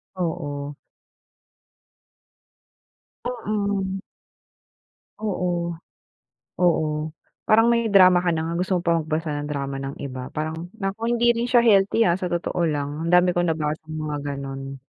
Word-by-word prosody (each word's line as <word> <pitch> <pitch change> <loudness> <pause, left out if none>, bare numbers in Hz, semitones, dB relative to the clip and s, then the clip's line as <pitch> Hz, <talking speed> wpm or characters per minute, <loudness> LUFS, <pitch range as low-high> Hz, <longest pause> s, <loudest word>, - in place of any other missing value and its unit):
Oo. 145 -5 -3 2.5
Mm. 205 -5 -2 1.2
Oo, 175 -4 -1 0.8
oo, 170 -3 +3 0.6
parang 225 +1 +6
may 235 -1 +2
drama 185 -3 +7
ka 180 - -1
na 160 - -1
nga 165 +1 -3
gusto 185 0 +1
mo - - 0
pa 170 -1 +3
magbasa 155 0 -2
ng 145 - -5
drama 140 -2 -3
ng 135 0 -5
iba, 130 -2 -6
parang 160 +3 -4
naku, 200 +2 -3
hindi 240 0 +4
rin 235 +1 -2
siya 240 -1 +5
healthy 205 0 +4
ah, 170 -1 +3
sa 180 - -1
totoo 175 +1 -2
lang. 145 -2 -1 0.2
Ang - - 0
dami 180 0 +5
kong 175 -1 +1
nabasang 155 0 -2
mga 155 -1 -3 0.2
gano'n. 135 0 -6
175 Hz, 135 wpm, -24 LUFS, 155-195 Hz, 2.5 s, drama